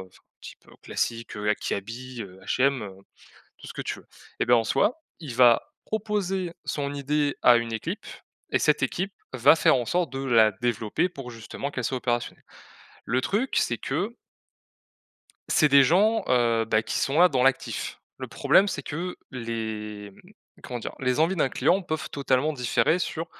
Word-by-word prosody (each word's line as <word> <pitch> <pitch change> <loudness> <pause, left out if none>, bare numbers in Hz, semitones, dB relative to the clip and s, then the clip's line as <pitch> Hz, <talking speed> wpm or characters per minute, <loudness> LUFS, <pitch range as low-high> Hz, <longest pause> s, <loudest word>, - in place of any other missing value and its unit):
enfin - - -23
un - - -59
type, - - -12
heu, - - -17
classique, 115 -1 -3
heu, 105 0 -3
a 105 - +4
Kiabi, 120 +4 -5
heu, 95 -1 -12
H&M, 135 -2 +1
heu, 100 - -6 0.7
tout - - -11
ce - - -8
que - - -5
tu - - -4
veux - - -21 0.3
et - - +1
bah, 120 - +5
en 115 - +3
soi, 220 - +1 0.2
il 145 -8 -7
va 120 -2 +6 0.2
proposer 195 -5 -2
son 140 -1 -2
idée 145 +1 0
à 120 -1 +7
une 115 -1 -3
équipe 170 - -4 0.5
et - - +3
cette - - +2
équipe 195 +2 -2 0.2
va 130 +4 +6
faire 160 - +4
en 120 - -2
sorte 175 -2 0
de 135 - -5
la 115 -4 +5
développer, 120 - -1
pour 135 -8 -9
justement 115 +5 -6
qu'elle 125 -4 -3
soit 130 - -1
opérationnelle. 120 -1 -2 0.6
Le 125 +3 0
truc, 225 - -1
c'est 120 - +1
que 195 - -3 1.3
c'est 150 -3 +4
des 140 -1 +7
gens, 210 - +3
heu, 115 -2 +3
bah, 110 0 +1
qui - - -3
sont 140 +3 0
là 180 - +8
dans 130 -5 +1
l'actif. 135 -1 -1 0.2
Le - - -5
problème 195 - +3
c'est 145 -8 -3
que 175 +6 -5
les, 110 -4 -5
mmh, - - -19 0.3
comment 125 - -5
dire? - - -6
Les 125 +2 0
envies 170 +4 +2
d'un 145 -5 +2
client 190 +2 +2
peuvent 155 -3 -4
totalement 140 +1 +1
différer 140 +5 +1
sur 165 -1 -3
130 Hz, 185 wpm, -26 LUFS, 115-165 Hz, 1.3 s, là